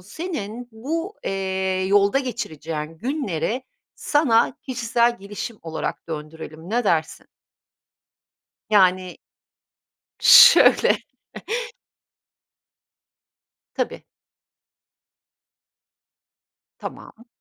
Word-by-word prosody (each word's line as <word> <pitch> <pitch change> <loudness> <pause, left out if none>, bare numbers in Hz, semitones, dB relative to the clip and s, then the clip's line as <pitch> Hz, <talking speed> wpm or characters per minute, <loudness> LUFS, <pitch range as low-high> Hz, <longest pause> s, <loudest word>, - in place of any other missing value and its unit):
Senin 240 - -6
bu, 325 - -4
eee, 190 -1 -2
yolda 200 +5 +3
geçireceğin 160 - -5
günleri 250 - -3 0.3
sana 260 -6 +2
kişisel 235 -1 0
gelişim 205 +3 -7
olarak 160 0 -5
döndürelim, 160 +2 -8
ne 240 +1 0
dersin? 160 -5 -1 1.4
Yani 185 -3 +3 1.0
Şöyle. - - +7 2.8
Tabii. - - -4 2.7
Tamam. 235 +2 -10
205 Hz, 60 wpm, -22 LUFS, 175-245 Hz, 2.8 s, Şöyle